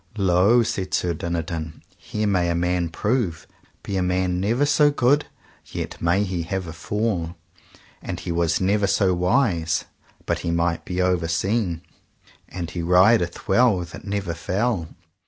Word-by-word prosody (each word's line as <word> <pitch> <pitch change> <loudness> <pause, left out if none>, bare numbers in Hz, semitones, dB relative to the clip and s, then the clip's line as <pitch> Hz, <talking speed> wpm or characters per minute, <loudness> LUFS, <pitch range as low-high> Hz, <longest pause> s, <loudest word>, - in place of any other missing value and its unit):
Lo, 100 +5 +4
said 95 -4 -2
Sir 90 -1 0
Dinadan, 80 -1 -4
here 105 +3 -4
may 90 -4 +1
a 85 - 0
man 90 0 0
prove, 105 -3 -1 0.4
be 100 - -3
a - - +1
man 90 0 0
never 115 +9 +1
so 145 0 +4
good 145 +1 +2 0.4
yet - - -6
may 85 +4 +2
he 90 -3 -2
have 95 +3 -3
a 80 - -7
fall, 90 -1 -2 0.7
and - - -5
he - - -4
was 85 -1 +1
never 100 +2 +2
so 95 -1 +2
wise 90 - +1 0.4
but - - -1
he - - -3
might 85 0 0
be 90 0 -3
overseen, 90 +1 0 0.7
and 85 -2 -5
he 85 - -4
rideth 90 +2 +3
well 105 -2 +4
that 85 - -9
never 100 -3 -3
fell. 95 +1 -1
90 Hz, 155 wpm, -23 LUFS, 85-105 Hz, 0.7 s, Lo